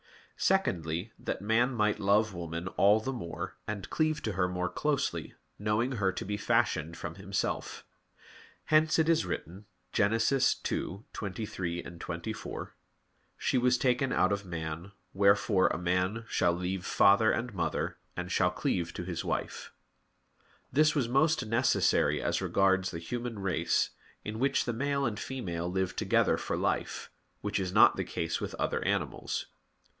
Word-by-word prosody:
Secondly, 90 - 0
that - - -4
man 115 +4 +3
might 105 -1 +1
love 105 +1 +3
woman 85 0 -5
all 100 +3 +4
the 130 +5 -3
more, 85 -9 -5
and 100 -2 -4
cleave 155 -1 +1
to 110 - -1
her 95 -1 +1
more 90 0 -1
closely, 140 - -1 0.2
knowing 105 +5 +1
her 100 -5 +1
to 90 - -5
be 105 +1 -2
fashioned 100 -8 +1
from 85 - -5
himself. 100 +1 -3 0.8
Hence 155 0 +4
it 160 -1 +3
is 160 - +3
written 90 +3 -5 0.3
(Gen. 100 - +3
2:23, 100 -6 -1
24): 85 +6 -6 0.6
"She 130 - +1
was 125 0 +3
taken 125 +1 +1
out 95 - +3
of 100 0 -1
man, 85 +1 -5 0.2
wherefore 100 0 +4
a - - -1
man 90 +6 0
shall 85 -5 +2
leave 90 +1 -3
father 100 +4 +5
and 120 0 -2
mother, - - -2 0.2
and 90 +1 -4
shall - - +3
cleave 85 -2 -1
to - - -4
his 85 -1 -4
wife." - - -3 1.0
This 155 +4 +4
was 135 -5 +1
most 135 +2 +2
necessary 115 +3 +2
as - - 0
regards 95 -1 +2
the 85 - -5
human 120 +7 -4
race, 90 -4 +1 0.3
in 110 +1 -4
which 135 +1 +2
the 120 - -1
male 140 +3 0
and 110 -3 -2
female 90 -10 -4
live 95 -1 -1
together - - +2
for - - -3
life; - - -2 0.3
which 105 -1 -1
is 95 -2 -2
not 105 - +6
the - - -1
case 80 0 -3
with - - -4
other - - -1
animals. - - -1
100 Hz, 150 wpm, -30 LUFS, 90-120 Hz, 1.0 s, not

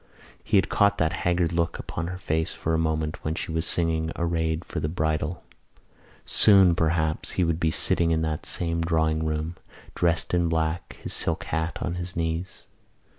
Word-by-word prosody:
He 105 - +2
had 95 - +3
caught 100 0 +3
that 80 -2 +1
haggard 85 0 0
look 85 0 0
upon 80 0 -5
her 90 +1 -5
face 80 -3 -1
for 80 - -3
a 80 - +2
moment 80 -1 -1
when 80 +1 -2
she 80 - -4
was 80 0 0
singing 80 -1 +1
Arrayed 80 -1 -1
for - - -4
the 75 - -2
Bridal. 80 0 -2 0.8
Soon, 95 -4 +6
perhaps, 80 -1 0
he 90 - +1
would 85 -1 0
be 80 - +2
sitting 85 +1 +2
in 80 -1 +1
that 80 -1 -3
same 85 -1 -1
drawing 80 -1 +1
room, 80 +2 -2 0.4
dressed 85 0 0
in 85 -1 +2
black, 80 0 -2
his - - -2
silk - - +1
hat 80 +1 -2
on 85 - -2
his 90 +1 -7
knees. 85 +2 -3
80 Hz, 180 wpm, -25 LUFS, 80-85 Hz, 0.8 s, Soon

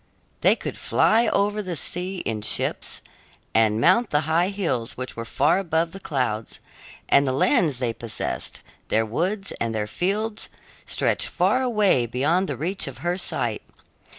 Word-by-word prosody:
They - - +5
could - - -6
fly 230 +2 +3
over 205 +1 +1
the 185 -4 -4
sea 180 +5 -2
in 110 -2 -2
ships 105 - 0 0.5
and 110 -1 +3
mount 190 - +4
the 150 - +2
high 165 +4 +1
hills 165 - -2
which 130 0 -6
were 115 - -5
far 145 +9 +2
above 165 -3 0
the 195 - -8
clouds; 125 - -2 0.5
and 140 0 +4
the - - +2
lands 145 +2 +2
they 120 -2 -1
possessed, 110 - -4 0.3
their 110 0 +2
woods 185 - -2
and 115 -1 -1
their 105 -1 -1
fields, 210 - -2 0.4
stretched - - +1
far 255 - +2
away 210 - +2
beyond 155 +11 +1
the 140 - -3
reach 175 +5 -1
of 130 -2 -8
her 175 +1 +1
sight. 120 - -2
160 Hz, 160 wpm, -24 LUFS, 120-195 Hz, 0.5 s, They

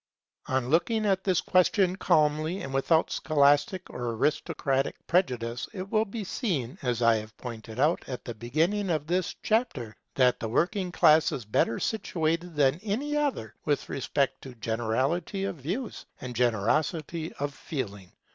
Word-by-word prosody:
On 130 -1 0
looking 215 +7 +2
at 190 -2 +2
this 185 -3 +2
question 185 0 +3
calmly 155 0 +2
and 135 - -6
without 160 +4 +2
scholastic 145 +5 +2
or 120 -1 -3
aristocratic 135 0 0
prejudice, 125 -9 0
it 190 -1 -6
will 220 0 +3
be 215 +1 -5
seen, 165 - -2
as 125 -2 -1
I 115 -2 +4
pointed 115 -1 -8
out 150 +5 +2
at 125 - -6
the 120 - -4
beginning 160 - 0
of 155 -3 0
this 180 +2 -1
chapter, 150 - 0 0.2
that 125 -2 +3
the 110 - -3
working 180 - 0
class 155 -2 +5
is 125 - -4
better 110 +2 +1
situated 170 -5 -1
than 145 +1 +3
any 245 +8 -2
other 280 - -1
with 145 -2 -1
respect 140 0 -1
to 130 -2 -10
generality 120 - -1
of 195 - -3
views 185 - -5
and 125 -1 -6
generosity 150 - 0
of 145 0 -3
feeling. 105 - -6
150 Hz, 150 wpm, -28 LUFS, 125-185 Hz, 0.2 s, class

